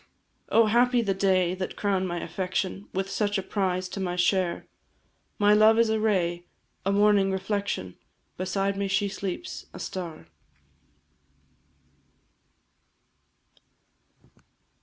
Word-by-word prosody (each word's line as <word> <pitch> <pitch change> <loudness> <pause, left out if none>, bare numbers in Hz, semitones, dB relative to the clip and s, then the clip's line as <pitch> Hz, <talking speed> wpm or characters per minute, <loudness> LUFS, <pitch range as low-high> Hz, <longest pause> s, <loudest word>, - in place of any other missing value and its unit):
Oh, 230 0 +5
happy 240 +2 +3
the 200 -3 +1
day 185 -2 +2
that 185 0 -5
crown'd 195 -2 0
my 175 -1 -3
affection 190 +1 -3
With 190 +1 -2
such 205 +1 -1
a 195 - -2
prize 185 -2 -1
to 195 - -6
my 180 -2 -2
share! 180 0 +1 0.7
My 205 0 +5
love 215 +1 +6
is 230 -1 +4
a 220 - +1
ray, 175 -5 0 0.4
a 195 - +1
morning 200 -1 +4
reflection, 190 - -3 0.4
Beside 195 +2 -1
me 200 0 -1
she 195 +1 +1
sleeps, 200 - -5
a - - -8
star. 170 - -6
195 Hz, 115 wpm, -26 LUFS, 185-205 Hz, 0.7 s, love